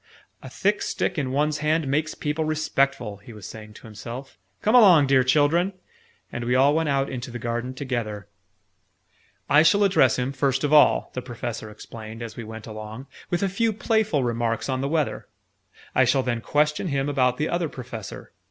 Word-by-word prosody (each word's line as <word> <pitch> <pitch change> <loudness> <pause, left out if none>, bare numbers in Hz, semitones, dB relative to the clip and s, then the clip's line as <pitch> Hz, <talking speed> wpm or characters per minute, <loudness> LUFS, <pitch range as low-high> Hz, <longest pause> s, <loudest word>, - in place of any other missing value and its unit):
"A 135 - -9
thick 205 +10 0
stick - - -1
in 130 -3 -2
one's 150 +2 0
hand 155 0 +1
makes 150 +3 -1
people 150 +2 -2
respectful," 135 -8 0
he 100 +4 -13
was 105 -2 -11
saying 110 -1 -10
to - - -14
himself. 115 +2 -9 0.2
"Come 215 - +2
along, 190 - +7
dear 135 -1 +4
children!" 155 +8 +2 0.6
And 120 - -4
we 125 +1 +1
all 135 +3 +5
went 160 -1 +1
out 135 0 +1
into 125 -1 -6
the 120 - -6
garden 120 +2 -3
together. 115 -7 -4 1.2
"I 145 +2 +6
shall 200 +6 +4
address 185 -10 +4
him, 125 +1 -1
first 135 0 0
of 145 +1 +1
all," 150 -1 +5
the 125 - -4
Professor 120 -3 -6
explained 110 +1 -9
as 115 - -8
we 115 - -6
went 110 0 -9
along, 110 +3 -8 0.2
"with 175 +2 -1
a - - +2
few 225 +4 0
playful 215 - +1
remarks 115 -1 -1
on 130 0 -1
the 140 - -1
weather. 155 -2 -1 0.7
I - - +4
shall 135 - +2
then 120 -2 -2
question 150 - +1
him 140 -3 -1
about 130 -3 +1
the 150 - 0
Other 170 -2 -1
Professor. 120 -6 -8
135 Hz, 190 wpm, -24 LUFS, 120-155 Hz, 1.2 s, along